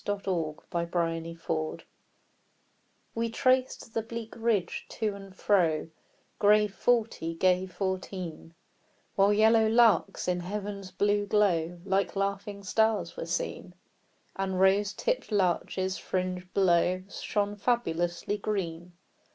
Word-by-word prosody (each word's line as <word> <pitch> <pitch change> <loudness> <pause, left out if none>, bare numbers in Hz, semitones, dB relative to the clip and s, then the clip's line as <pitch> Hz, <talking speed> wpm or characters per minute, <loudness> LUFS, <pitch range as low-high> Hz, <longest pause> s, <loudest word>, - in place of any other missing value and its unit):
22 185 -6 -2 0.2
The 170 -1 0
Train 165 -1 -1
of 165 0 -11
Life 155 -1 -2 1.3
We 230 0 -1
traced 255 -1 +1
the 225 - 0
bleak 225 0 -7
ridge, 225 -6 -1
to 215 -3 -2
and 195 -1 -11
fro, 165 -7 +2 0.5
Grave 210 0 +4
forty, 225 -9 0
gay 185 +2 +2
fourteen; 185 -3 -5 0.6
While 200 +1 +4
yellow 220 +1 +5
larks, 225 -6 +3
in 180 -1 +1
heaven's 200 +1 -5
blue 205 +2 +1
glow, 175 -5 +2
Like 195 +1 0
laughing 200 +1 -2
stars 210 -3 +1
were 165 - -5
seen, 180 +1 -3 0.6
And 190 -1 -2
rose 195 +2 +4
tipp'd - - -2
larches, 190 -1 0
fringed 185 0 -3
below, 185 -1 +3
Shone 205 +1 -2
fabulously 195 -4 -1
green. 175 -4 -3
195 Hz, 120 wpm, -29 LUFS, 175-210 Hz, 1.3 s, yellow